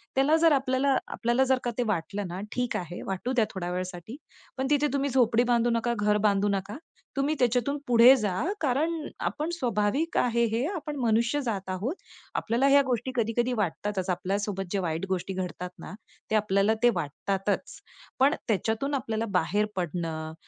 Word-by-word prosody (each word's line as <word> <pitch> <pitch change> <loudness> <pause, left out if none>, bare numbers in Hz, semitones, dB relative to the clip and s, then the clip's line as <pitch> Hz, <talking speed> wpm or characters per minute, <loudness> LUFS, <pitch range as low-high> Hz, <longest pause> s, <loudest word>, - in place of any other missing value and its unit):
त्याला 275 +4 +4
जर 330 0 +5
आपल्याला 265 0 +2
आपल्याला 240 +3 +1
जर 265 0 +3
का 240 - -1
ते 245 - +2
वाटलं 200 +1 -2
ना, 180 +1 -6
ठीक 245 -1 -1
आहे, 175 -1 -6
वाटू 195 +7 -2
द्या 235 -4 +3
थोड्या 180 -3 -4
वेळासाठी, 180 +4 -5 0.4
पण 265 0 -1
तिथे 295 0 +3
तुम्ही 280 0 0
झोपडी 240 -2 +3
बांधू 240 0 +3
नका, 235 +1 0
घर 210 0 +3
बांधू 205 0 +3
नका. 200 +3 -2 0.4
तुम्ही 290 +3 +1
त्याच्यातून 250 +3 +1
पुढे 245 +2 +8
जा, 210 -5 -1 0.3
कारण 300 +4 +1 0.4
आपण 310 +2 -4
स्वाभाविक 245 +6 0
आहे 235 -1 +2
हे 240 +4 +1
आपण 300 -3 -5
मनुष्य 235 +5 +2
जात 200 -6 -3
आहोत. 210 - -2 0.4
आपल्याला 240 +5 +1
ह्या 280 0 +6
गोष्टी 250 +1 -1
कधी-कधी 240 +1 0
वाटतातच. 195 +1 -2
आपल्यासोबत 195 +2 -2
जे 200 - 0
वाईट 165 0 -2
गोष्टी 190 +1 -2
घडतात 180 -1 -4
ना, - - -8 0.4
ते - - +3
आपल्याला 205 0 +3
ते 240 - +7
वाटतातच. 190 +5 -2 0.4
पण 280 +4 +4
त्याच्यातून 225 - 0
आपल्याला 225 -4 -2
बाहेर 205 +6 0
पडणं 165 -3 -3
225 Hz, 165 wpm, -27 LUFS, 195-260 Hz, 0.4 s, पुढे